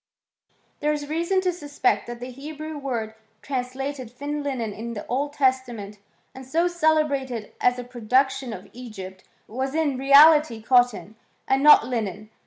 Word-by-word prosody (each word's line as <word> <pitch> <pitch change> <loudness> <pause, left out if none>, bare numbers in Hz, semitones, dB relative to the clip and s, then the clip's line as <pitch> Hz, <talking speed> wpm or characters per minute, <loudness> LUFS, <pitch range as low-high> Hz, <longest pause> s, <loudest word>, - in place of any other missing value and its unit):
There 300 - +1
is 295 -1 -3
reason 340 +5 0
to 365 -1 0
suspect 290 -6 -1
that 240 0 -7
the 250 +1 -7
Hebrew 305 +4 -8
word 240 -6 -4 0.3
trans 255 -2 -3
lated 270 -3 -5
j^ne 290 +4 -4
linen 245 -7 -3
in 235 +3 -6
the 205 - -6
Old 285 +4 -2
Testament, 245 -7 -1 0.3
and 260 - -10
so 320 +7 0
celebnited: 305 -9 0
as 245 0 +3
a 250 - -5
production 255 +2 0
of - - -8
Egypt, 195 -6 -9 0.2
was 265 +5 -4
in 295 -5 0
reality 285 -2 +6
cottony 245 -2 +2 0.3
and 270 +1 +2
no£' 300 -5 +8
linen. 215 -3 -4
260 Hz, 155 wpm, -24 LUFS, 235-290 Hz, 0.3 s, no£